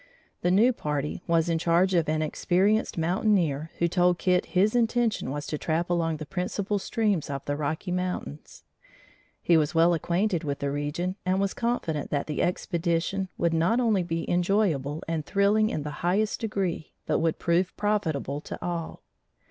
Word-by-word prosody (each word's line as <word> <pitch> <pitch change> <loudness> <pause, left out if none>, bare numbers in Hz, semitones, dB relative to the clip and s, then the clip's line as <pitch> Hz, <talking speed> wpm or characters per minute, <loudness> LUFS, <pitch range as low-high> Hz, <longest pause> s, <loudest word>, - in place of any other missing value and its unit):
The 175 - +1
new 220 +8 +5
party 150 -5 -3
was 165 -1 +2
in 165 -1 +1
charge 175 +3 +2
of 170 -3 +2
an 155 0 +1
experienced 190 +8 +1
mountaineer, 165 -3 +1
who 170 - +2
told 175 0 +2
Kit 180 -1 +1
his 210 +5 +3
intention 235 - +1
was 145 +2 -4
to 150 - -4
trap 170 +2 -1
along 165 -2 0
the 155 - -6
principal 190 +5 -2
streams 205 - 0
of 140 -1 -4
the 145 - -1
Rocky 155 +5 -3
Mountains. 180 - -4 0.8
He 170 - +4
was 155 +2 0
well 165 +1 +5
acquainted 175 +2 0
with 140 -2 -2
the 140 0 -2
region 150 +6 -2
and 185 0 +1
was 200 0 0
confident 200 -11 -2
that 145 -1 -1
the 150 - -2
expedition 175 +2 -1
would 170 -1 +1
not 170 +9 +2
only 220 -6 +2
be 165 -1 -3
enjoyable 175 -6 +1
and 165 -2 -2
thrilling 205 +6 +2
in 150 - -3
the 150 - -4
highest 200 +5 +1
degree, 195 -7 -2
but - - +1
would 165 -1 0
prove 175 +2 0
profitable 160 -9 -1
to - - -7
all. 170 -2 -4
175 Hz, 170 wpm, -27 LUFS, 155-195 Hz, 0.8 s, new